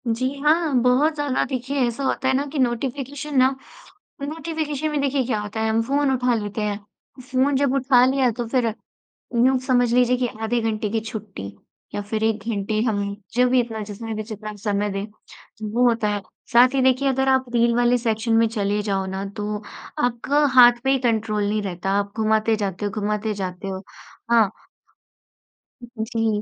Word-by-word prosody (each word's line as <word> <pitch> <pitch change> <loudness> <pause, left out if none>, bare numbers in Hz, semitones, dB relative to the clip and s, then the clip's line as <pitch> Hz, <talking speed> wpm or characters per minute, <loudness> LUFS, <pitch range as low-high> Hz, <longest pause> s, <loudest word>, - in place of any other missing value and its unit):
जी 230 +3 0
हाँ, 310 +1 +2
बहुत 255 +6 +3
ज़्यादा 290 -3 0
देखिए 265 +1 -3
ऐसा 235 +4 -4
होता 265 0 0
है 265 - +3
ना 280 +2 0
कि 295 - -2
नोटिफिकेशन 270 +4 -2
ना 260 0 +6 0.7
नोटिफिकेशन 310 0 -3
में 300 - -1
देखिए 275 -1 +1
क्या 225 -3 -1
होता 210 +2 -5
है, 220 - +1
हम 220 +1 +2
फ़ोन 280 +3 +1
उठा 250 -1 +1
लेते 210 0 -3
हैं। 210 -1 -2 0.4
फ़ोन 260 +2 +1
जब 280 -1 +1
उठा 260 -2 +4
लिया 260 -1 +2
तो 240 - -2
फिर, 235 -2 +1 0.7
यूँ 260 0 +3
समझ 245 -2 +3
लीजिए 250 0 +4
कि 250 0 0 0.2
आधे 235 +2 0
घंटे 215 -1 -1
की 225 +1 0
छुट्टी 215 - -7 0.5
या - - -1
फिर 215 +2 -2
1 220 -1 0
घंटे 215 0 -1
हम 205 -2 0 0.3
जो 250 +1 +4
भी 255 0 +4
इतना 225 -2 -4
जितना 220 +2 -6
भी 215 - -3
जितना 215 -1 -7
हम 210 - -10
समय 205 0 -1
दें, 195 +1 -3 0.7
वो 245 +2 +2
होता 230 -2 +1
है। 205 0 -1 0.3
साथ 245 +1 +7
ही 270 - +2
देखिए 260 +1 +3
अगर 265 0 +1
आप 265 0 +3
रील 235 0 +3
वाले 245 0 +3
सेक्शन 225 -1 -1
में 230 0 +4
चले 205 -2 -1
जाओ 195 -2 -1
ना 190 +1 -4
तो 210 0 -3 0.4
आपका 245 +5 +1
हाथ 240 -1 +7
पे 265 - +2
ही 270 - +3
कंट्रोल 220 -4 0
नहीं 210 0 0
रहता, 190 -1 -3
आप 200 0 0
घुमाते 220 0 +2
जाते 200 -2 -3
हो - - -2
घुमाते 210 +1 -1
जाते 190 -1 -5
हो, 190 0 -5 0.5
हाँ। 225 -4 +5 1.5
जी। 220 -1 -1
230 Hz, 190 wpm, -22 LUFS, 210-260 Hz, 1.5 s, साथ